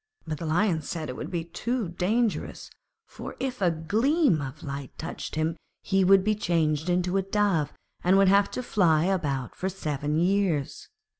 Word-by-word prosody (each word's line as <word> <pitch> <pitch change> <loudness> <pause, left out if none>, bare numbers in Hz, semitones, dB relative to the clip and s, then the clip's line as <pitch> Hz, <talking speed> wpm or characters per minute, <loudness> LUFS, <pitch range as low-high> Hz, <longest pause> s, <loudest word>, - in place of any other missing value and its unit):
But 155 -1 -4
the 165 - -4
Lion 170 0 +2
said 155 0 -5
it 125 - -5
would - - -6
be 170 -2 -2
too 230 +6 -2
dangerous, 210 +6 -1 0.3
for - - -9
if 255 -4 -3
a 180 - +4
gleam 215 - +2
of 140 +3 -7
light 140 -2 -6
touched 165 - -6
him 160 +1 0 0.3
he 195 0 +2
would 190 +1 +6
be 215 +2 +2
changed 165 -5 0
into 180 +1 +1
a - - +3
Dove 195 -6 +1 0.3
and 185 +2 +4
would 195 0 +5
have 200 +1 +4
to 255 - -2
fly 170 -9 +3
about 145 -9 -1
for 190 - -3
seven 150 -5 -2
years. 175 -5 0
180 Hz, 175 wpm, -27 LUFS, 155-200 Hz, 0.3 s, would